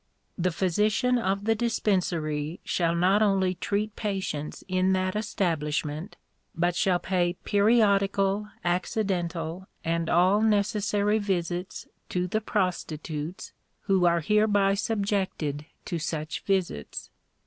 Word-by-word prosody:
"The 185 Hz, +1 st, +1 dB
physician 210 Hz, +8 st, +1 dB
of 200 Hz, -2 st, -1 dB
the 225 Hz, -, +4 dB
Dispensary 175 Hz, -9 st, -1 dB
shall 170 Hz, -1 st, 0 dB
not 185 Hz, +4 st, +3 dB
only 195 Hz, -3 st, +3 dB
treat 205 Hz, +3 st, -2 dB
patients 190 Hz, -8 st, -3 dB
in 185 Hz, 0 st, +2 dB
that 185 Hz, 0 st, 0 dB
establishment, 160 Hz, -5 st, -2 dB, 0.4 s
but 175 Hz, +1 st, +1 dB
shall 180 Hz, 0 st, +2 dB
pay 175 Hz, -1 st, 0 dB
periodical, 200 Hz, -1 st, +3 dB, 0.2 s
accidental, 175 Hz, -1 st, -1 dB, 0.2 s
and 165 Hz, 0 st, 0 dB
all 185 Hz, +4 st, +4 dB
necessary 210 Hz, 0 st, +2 dB
visits 180 Hz, -2 st, -2 dB, 0.2 s
to 180 Hz, 0 st, 0 dB
the 215 Hz, +4 st, -1 dB
prostitutes, 170 Hz, -5 st, -3 dB, 0.3 s
who 190 Hz, -2 st, +3 dB
are 170 Hz, 0 st, +3 dB
hereby 205 Hz, +1 st, +3 dB
subjected 195 Hz, -8 st, -1 dB, 0.2 s
to 170 Hz, -, -3 dB
such 155 Hz, -1 st, -3 dB
visits. 185 Hz, -, -2 dB
190 Hz, 110 wpm, -27 LUFS, 170-205 Hz, 0.4 s, the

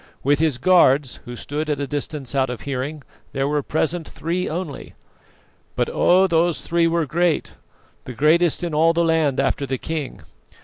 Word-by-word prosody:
With 145 Hz, +1 st, +2 dB
his 155 Hz, -5 st, +1 dB
guards, 145 Hz, -4 st, +3 dB
who 120 Hz, -, -7 dB
stood 150 Hz, +5 st, -4 dB
at 145 Hz, -2 st, -1 dB
a 140 Hz, -, -1 dB
distance 145 Hz, -1 st, -4 dB
out 135 Hz, -1 st, +1 dB
of 125 Hz, -, -6 dB
hearing, 140 Hz, +2 st, -4 dB, 0.3 s
there 135 Hz, 0 st, 0 dB
were 150 Hz, 0 st, 0 dB
present 160 Hz, +3 st, -2 dB
three 175 Hz, +3 st, -3 dB
only; 160 Hz, -3 st, -6 dB, 0.8 s
but -, -, -1 dB
oh! 185 Hz, +2 st, +4 dB
those 170 Hz, -4 st, +1 dB
three 170 Hz, 0 st, +1 dB
were 165 Hz, -1 st, +1 dB
great, 165 Hz, +2 st, 0 dB, 0.5 s
the 125 Hz, -, -7 dB
greatest 160 Hz, +6 st, +2 dB
in 170 Hz, -2 st, -3 dB
all 165 Hz, +2 st, +4 dB
the 170 Hz, 0 st, +1 dB
land 160 Hz, -5 st, +1 dB
after 140 Hz, +1 st, 0 dB
the 130 Hz, 0 st, -2 dB
king. 155 Hz, 0 st, -5 dB
150 Hz, 175 wpm, -21 LUFS, 140-165 Hz, 0.8 s, oh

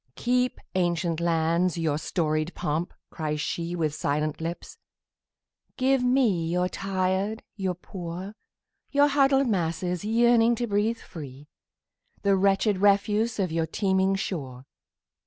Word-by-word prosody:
"Keep, 250 Hz, +1 st, 0 dB
ancient 175 Hz, -2 st, 0 dB
lands, 170 Hz, +1 st, +1 dB
your 155 Hz, -3 st, 0 dB
storied 155 Hz, 0 st, -1 dB
pomp!" 160 Hz, +4 st, -2 dB, 0.2 s
cries 155 Hz, -2 st, -3 dB
sheWith 165 Hz, -1 st, -2 dB
silent 150 Hz, +1 st, -1 dB
lips. 170 Hz, +2 st, -6 dB, 1.0 s
"Give 265 Hz, -1 st, +2 dB
me 235 Hz, -10 st, +2 dB
your 180 Hz, +1 st, +1 dB
tired, 195 Hz, +3 st, -1 dB
your 190 Hz, -3 st, -2 dB
poor, 180 Hz, +2 st, -7 dB, 0.6 s
Your 285 Hz, +1 st, +4 dB
huddled 275 Hz, -1 st, +3 dB
masses 180 Hz, -2 st, -1 dB
yearning 235 Hz, +1 st, +4 dB
to 240 Hz, -, -2 dB
breathe 215 Hz, +2 st, 0 dB
free, 145 Hz, -6 st, -10 dB, 0.7 s
The 200 Hz, -1 st, +4 dB
wretched 195 Hz, +1 st, +2 dB
refuse 205 Hz, +3 st, +2 dB
of 190 Hz, -5 st, 0 dB
your 165 Hz, 0 st, 0 dB
teeming 190 Hz, +2 st, +1 dB
shore. 135 Hz, -10 st, -5 dB
185 Hz, 120 wpm, -26 LUFS, 165-215 Hz, 1.0 s, Your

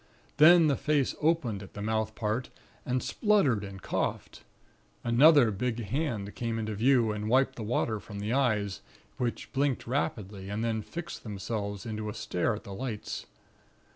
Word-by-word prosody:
Then 165 Hz, +3 st, +8 dB
the 145 Hz, -3 st, +3 dB
face 145 Hz, -2 st, +1 dB
opened 150 Hz, -11 st, +1 dB
at 100 Hz, -, -12 dB
the 105 Hz, -, -5 dB
mouth 110 Hz, 0 st, -1 dB
part, 110 Hz, +2 st, -2 dB, 0.4 s
and 125 Hz, 0 st, 0 dB
spluttered 195 Hz, -, +2 dB
and 95 Hz, -1 st, -8 dB
coughed. -, -, -3 dB, 0.6 s
Another 125 Hz, +1 st, +6 dB
big 120 Hz, +3 st, -2 dB
hand 110 Hz, -5 st, -2 dB
came 115 Hz, -1 st, -3 dB
into 110 Hz, -1 st, -2 dB
view, 115 Hz, +1 st, +3 dB
and 105 Hz, 0 st, -3 dB
wiped 130 Hz, +2 st, +3 dB
the 120 Hz, -, -7 dB
water 110 Hz, 0 st, 0 dB
from 105 Hz, 0 st, -9 dB
the 105 Hz, +3 st, -2 dB
eyes, 110 Hz, -8 st, +1 dB, 0.4 s
which 120 Hz, -2 st, -3 dB
blinked 135 Hz, -1 st, 0 dB
rapidly, 105 Hz, -7 st, -3 dB
and 105 Hz, +2 st, -2 dB
then 110 Hz, -1 st, 0 dB
fixed 170 Hz, +9 st, -7 dB
themselves 100 Hz, 0 st, -4 dB
into 110 Hz, -1 st, -4 dB
a -, -, -6 dB
stare 100 Hz, +5 st, -1 dB
at 105 Hz, -, -9 dB
the 100 Hz, -, -8 dB
lights. 115 Hz, -1 st, -5 dB
115 Hz, 165 wpm, -29 LUFS, 105-135 Hz, 0.6 s, Then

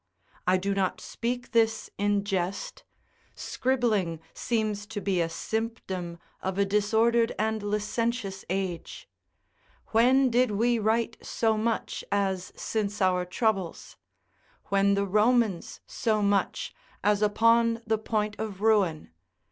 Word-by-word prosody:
I 185 Hz, +1 st, +5 dB
do 200 Hz, +2 st, -1 dB
not 195 Hz, -2 st, 0 dB
speak 245 Hz, +1 st, -4 dB
this 225 Hz, -2 st, +1 dB
in 205 Hz, 0 st, +2 dB
jest: 195 Hz, -, -3 dB, 0.5 s
scribbling 220 Hz, -10 st, 0 dB
seems 215 Hz, -3 st, -1 dB
to 220 Hz, -1 st, -5 dB
be 195 Hz, -3 st, 0 dB
a 165 Hz, -, 0 dB
symptom 190 Hz, -4 st, -4 dB, 0.2 s
of 190 Hz, 0 st, -3 dB
a 200 Hz, -, +3 dB
disordered 225 Hz, +3 st, +2 dB
and 220 Hz, 0 st, 0 dB
licentious 210 Hz, 0 st, -2 dB
age. 185 Hz, -2 st, -4 dB, 0.8 s
When 255 Hz, +3 st, +4 dB
did 250 Hz, +1 st, +3 dB
we 230 Hz, +3 st, +1 dB
write 225 Hz, +1 st, 0 dB
so 225 Hz, -1 st, +1 dB
much 225 Hz, +1 st, -2 dB
as 190 Hz, -2 st, 0 dB
since 210 Hz, -1 st, -2 dB
our 185 Hz, -2 st, +2 dB
troubles? 190 Hz, -2 st, -2 dB, 0.7 s
when 200 Hz, 0 st, +3 dB
the 200 Hz, 0 st, +1 dB
Romans 215 Hz, -1 st, +1 dB
so 215 Hz, -3 st, 0 dB
much, 200 Hz, -2 st, 0 dB, 0.3 s
as 205 Hz, +1 st, +3 dB
upon 230 Hz, +2 st, +3 dB
the 220 Hz, -1 st, +1 dB
point 215 Hz, -1 st, -1 dB
of 210 Hz, -3 st, -5 dB
ruin? 200 Hz, -, +2 dB
210 Hz, 125 wpm, -27 LUFS, 195-230 Hz, 0.8 s, I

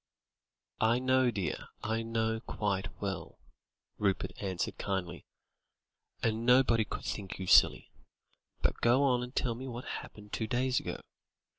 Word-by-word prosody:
"I 115 Hz, +2 st, +4 dB
know, 130 Hz, 0 st, +3 dB
dear; 100 Hz, -6 st, -3 dB, 0.2 s
I 110 Hz, +1 st, 0 dB
know 115 Hz, 0 st, -1 dB
quite 100 Hz, -3 st, -2 dB
well," 95 Hz, -4 st, -4 dB, 0.6 s
Rupert 100 Hz, -2 st, +1 dB
answered 95 Hz, -3 st, -2 dB
kindly; 95 Hz, -4 st, -3 dB, 1.0 s
"and 115 Hz, 0 st, +1 dB
nobody 125 Hz, -2 st, +5 dB
could -, -, -6 dB
think 100 Hz, -3 st, -4 dB
you 95 Hz, -, -5 dB
silly. -, -, +5 dB, 0.7 s
But -, -, +1 dB
go 125 Hz, +4 st, +4 dB
on 125 Hz, -3 st, +3 dB
and 125 Hz, +2 st, -7 dB
tell 120 Hz, -3 st, +1 dB
me 130 Hz, +3 st, -7 dB
what 120 Hz, 0 st, -6 dB
happened 105 Hz, -1 st, -8 dB
two 110 Hz, -, -1 dB
days 125 Hz, +1 st, +1 dB
ago. -, -, -5 dB
115 Hz, 140 wpm, -32 LUFS, 100-125 Hz, 1.0 s, nobody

